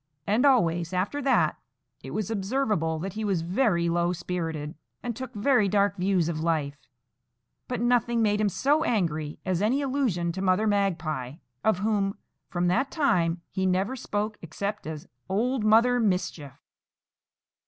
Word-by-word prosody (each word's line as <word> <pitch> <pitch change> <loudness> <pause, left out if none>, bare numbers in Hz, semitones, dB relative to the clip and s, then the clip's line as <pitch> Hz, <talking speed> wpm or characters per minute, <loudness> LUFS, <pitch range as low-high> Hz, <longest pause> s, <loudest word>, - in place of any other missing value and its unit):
And 230 +7 +3
always 170 -10 +2
after 200 +11 -1
that 270 -1 +2 0.4
it - - -8
was 215 -1 -3
observable 200 - 0
that 180 +4 -5
he 220 - -4
was 190 -6 0
very 175 -2 +1
low 175 +1 +1
spirited, 165 -4 -4 0.3
and 240 -2 -3
took 260 +1 -6
very 215 -1 +3
dark 200 0 +2
views 185 -2 +1
of 165 -2 -2
life; 155 -3 0 0.9
but 250 - -3
nothing 240 -1 +2
made 210 0 +2
him 210 - +2
so 290 - +2
angry 155 - -1
as 185 -1 0
any 235 +7 +2
allusion 255 -12 0
to 190 +3 -5
Mother 190 +2 +2
Magpie, 165 -10 -1 0.3
of 220 -4 +3
whom, 200 -1 0 0.3
from 175 0 -1
that 240 +10 +1
time, 175 - +1
he 190 0 0
never 190 +7 0
spoke 210 -3 -3
except 200 +4 -4
as 155 -2 -6 0.2
Old 235 +5 0
Mother 230 +3 +5
Mischief. 180 - -1
195 Hz, 155 wpm, -27 LUFS, 170-230 Hz, 0.9 s, Mother